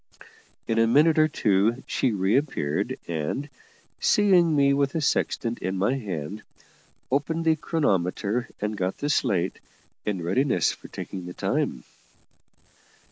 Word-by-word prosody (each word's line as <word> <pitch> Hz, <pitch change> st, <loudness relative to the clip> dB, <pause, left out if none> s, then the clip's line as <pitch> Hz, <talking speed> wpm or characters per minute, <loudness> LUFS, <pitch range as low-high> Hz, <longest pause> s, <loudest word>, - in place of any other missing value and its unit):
In 115 Hz, 0 st, +1 dB
a 115 Hz, -, +4 dB
minute 150 Hz, +6 st, +4 dB
or 155 Hz, -, +6 dB
two 110 Hz, -3 st, +1 dB
she 130 Hz, -, 0 dB
reappeared, 100 Hz, -, 0 dB
and, 85 Hz, -, -3 dB, 0.5 s
seeing 180 Hz, -6 st, +4 dB
me 140 Hz, -1 st, +4 dB
with 140 Hz, 0 st, +1 dB
the 165 Hz, -, 0 dB
sextant 120 Hz, -5 st, 0 dB
in 95 Hz, +1 st, -3 dB
my 100 Hz, +7 st, +2 dB
hand, 100 Hz, -, -5 dB, 0.7 s
opened 160 Hz, +4 st, 0 dB
the 160 Hz, -1 st, +4 dB
chronometer 115 Hz, -, 0 dB
and 105 Hz, +1 st, -2 dB
got 95 Hz, -2 st, -2 dB
the 145 Hz, +1 st, -1 dB
slate, 95 Hz, -11 st, 0 dB, 0.4 s
in 95 Hz, -5 st, -2 dB
readiness 110 Hz, -, +2 dB
for -, -, -11 dB
taking 90 Hz, -2 st, -7 dB
the 90 Hz, -, -8 dB
time. -, -, -1 dB
115 Hz, 135 wpm, -25 LUFS, 95-145 Hz, 0.7 s, or